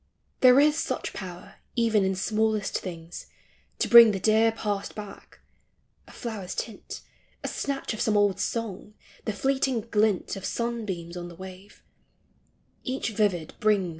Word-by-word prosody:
There 255 +1 +7
is 300 +2 +4
such - - -3
power 190 +1 -9 0.2
even 225 -4 +3
in 190 0 +1
smallest 215 +1 0
things 170 -2 -8 0.5
T*> - - 0
bring 235 -1 +10
the 195 - -2
dear 220 +3 +4
past 205 -3 -3
back; 205 -2 -10 0.7
a - - -14
flower's 215 -6 -6
tint, 220 -3 -6 0.4
A - - -2
snatch 275 -3 -3
of 220 - -5
some 215 -2 +2
old 205 -2 +2
song, 210 -2 -4 0.3
the - - 0
fleeting 265 +1 0
glint 210 -3 +1
Of 195 - -8
sunbeams 210 -8 -3
on 175 -1 -5
the 175 - -11
wave 190 +3 -12 0.5
— - - -40
each 255 -3 -2
vivid 195 -7 0
brings 215 -3 +3
MEMORY. 180 - -4
210 Hz, 155 wpm, -27 LUFS, 190-230 Hz, 0.7 s, bring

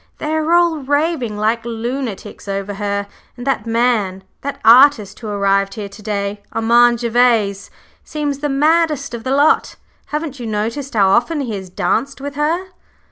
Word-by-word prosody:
They 305 +1 -3
are 315 +1 0
all 345 -2 +4
raving 285 -5 -1
like 220 +2 0
lunatics 235 -2 -5
over 200 +1 -3
her, 200 0 -2 0.3
and 245 - -8
that 265 -5 -1
man 225 -5 0 0.2
that 280 0 -5
artist 230 -4 +6
who 225 - -7
arrived 195 -1 +1
here 205 -2 -6
to 195 +2 -13
day, 205 -1 -3
Armand 235 +1 +3
Gervase, 230 -4 +2 0.3
seems 290 -2 -3
the 295 0 -2
maddest 300 -1 +1
of 235 -1 -6
the 260 - -3
lot. 290 +2 +3 0.3
Haven't 300 -3 -4
you 235 - -5
noticed 230 +6 -3
how 195 -3 +4
often 265 +10 +2
he 240 -5 -4
has 190 -2 -6
danced 220 +10 -1
with 285 +1 -6
her?" 325 +6 -1
235 Hz, 165 wpm, -18 LUFS, 205-285 Hz, 0.3 s, artist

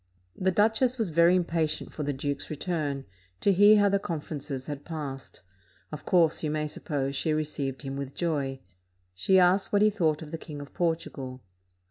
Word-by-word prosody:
The 190 - +1
duchess 220 +6 +2
was 220 -7 -1
very 170 +3 +5
impatient 165 -3 -1
for - - -5
the 145 0 -1
duke's 140 +1 -3
return, 150 -3 -2 0.3
to 200 - +3
hear 205 +3 +7
how 205 0 +5
the 200 0 +2
conferences 145 -6 -5
had 145 -1 -6
passed; 140 - -7 0.5
of 150 -1 -8
course, 165 -3 +4
you 155 - -1
may 150 0 -1
suppose, 140 -2 -3
she 155 +3 0
received 150 -3 -3
him 135 0 -4
with 140 -1 -6
joy. 140 -6 -2 0.5
She 190 - +3
asked 185 +2 +4
what 205 0 +4
he 215 - +5
thought 160 -6 0
of 150 - -10
the 165 - -5
King 150 -3 -8
of 145 -1 -10
Portugal. 155 -7 -3
155 Hz, 180 wpm, -28 LUFS, 140-180 Hz, 0.5 s, hear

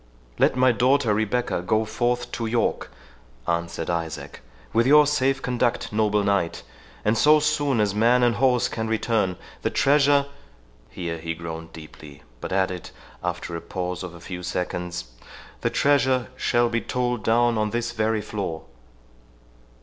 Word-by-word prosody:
"Let - - +4
my 130 0 +4
daughter 125 -1 +2
Rebecca 110 -1 0
go 110 +5 +1
forth 120 +2 -1
to 115 - -3
York," 115 +1 0 0.6
answered 85 -1 -2
Isaac, 85 -2 -4 0.3
"with 115 +2 +3
your 150 +2 +7
safe 135 -2 +1
conduct, 125 -3 -1
noble 105 -1 +2
knight, 100 -4 0 0.4
and 105 +2 +3
so 150 +6 +5
soon 145 -4 +1
as 105 -2 +2
man 120 +4 +3
and 120 -1 +2
horse 125 -1 +3
can 110 -2 -3
return, 110 -4 0 0.3
the - - 0
treasure— 140 0 +3 0.3
" - - -31
Here 85 -2 -5
he 85 0 -4
groaned 80 0 -7
deeply, 75 -3 -12 0.2
but - - -6
added, 95 -2 -1 0.3
after - - -3
the 85 - -4
pause 90 +1 -4
of 90 -2 -7
a - - -11
few 90 +1 -7
seconds,—"The 85 -8 -5
treasure 130 -3 +2
shall 120 -1 +2
be 115 0 -1
told 125 -3 -2
down 115 0 +3
on 105 0 +1
this 120 +1 -2
very 110 -1 0
floor." 95 -7 -4
110 Hz, 150 wpm, -24 LUFS, 90-125 Hz, 0.6 s, your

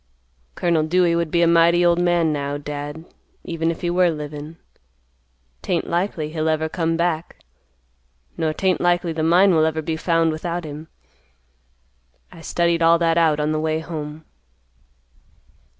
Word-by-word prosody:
"Colonel 170 -2 +1
Dewey 170 +2 +2
would 170 -1 -1
be 170 +2 +2
a - - +4
mighty 170 +1 +4
old 175 0 +3
man 175 -3 +2
now, 140 0 -3
Dad, 145 +2 -7 0.4
even 165 -1 -2
if 165 - -4
he 175 - -1
were 180 0 +3
livin.' 150 0 -7 1.0
'Tain't 175 -2 -1
likely 170 -3 -2
he'll 160 0 -1
ever 160 0 0
come 165 0 -1
back, 170 -1 -2 1.0
nor 160 -1 -1
tain't 185 +3 0
likely 175 -1 +1
the 160 - -3
mine 175 +4 +4
will 160 -1 +3
ever 160 0 -1
be 160 +1 -2
found 165 0 +1
without 170 +2 -4
him. 150 +1 -8 1.4
I 165 - -13
studied 170 0 0
all 165 0 +5
that 165 0 +2
out 155 -3 +2
on 150 +1 0
the 155 - -1
way 155 0 -1
home." 155 -1 -7
165 Hz, 155 wpm, -21 LUFS, 155-170 Hz, 1.4 s, all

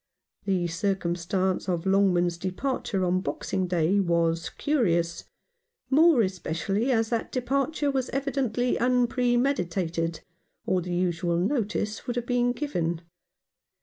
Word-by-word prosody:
The 190 -3 +1
circumstance 180 +1 -1
of 175 -1 -1
Longman's 180 -3 +2
departure 190 0 -2
on 180 +1 +1
Boxing 190 -1 -2
Day 175 +2 +2
was 165 -2 +1
curious; 170 - 0 0.7
more 305 -3 +6
especially 190 +5 -1
as 225 -2 +1
that 230 -1 -1
departure 275 +3 0
was 260 -2 -1
evidently 260 -3 -1
unpremeditated, 240 - +1 0.4
or 185 - +1
the 175 0 -3
usual 175 -1 0
notice 210 +1 -1
would 245 - -2
have 240 -1 -2
been 245 0 +1
given. 175 - -2
195 Hz, 115 wpm, -26 LUFS, 175-245 Hz, 0.7 s, more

